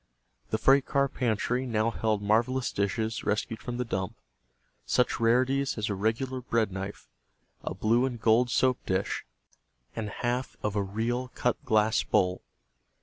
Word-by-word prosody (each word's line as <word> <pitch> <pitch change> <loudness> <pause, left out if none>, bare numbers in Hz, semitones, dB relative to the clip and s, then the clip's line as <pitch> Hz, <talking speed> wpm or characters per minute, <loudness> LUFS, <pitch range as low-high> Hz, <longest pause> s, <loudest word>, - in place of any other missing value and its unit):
The 110 - +1
freight 135 +4 +4
car 140 -1 +2
pantry 125 +1 -1
now 115 -1 +1
held 110 -3 -1
marvelous 120 +5 +1
dishes 110 +2 -1
rescued 110 +1 -1
from 120 -1 -4
the 125 - -1
dump; 95 -5 -3 0.7
such 125 - +1
rarities 130 +4 +2
as 110 -1 -1
a - - +1
regular 115 +6 -1
bread 115 -4 0
knife, 95 +2 -6 0.6
a - - -4
blue 120 +4 +2
and 120 -3 -5
gold 115 +2 +4
soap 130 +1 +2
dish, 95 +1 -1 0.7
and 110 -2 -3
half 120 +4 -2
of 105 -1 -1
a 105 - +2
real 115 +6 -2
cut 125 - 0
glass 110 0 +3
bowl. 90 -1 +1
115 Hz, 150 wpm, -28 LUFS, 105-125 Hz, 0.7 s, freight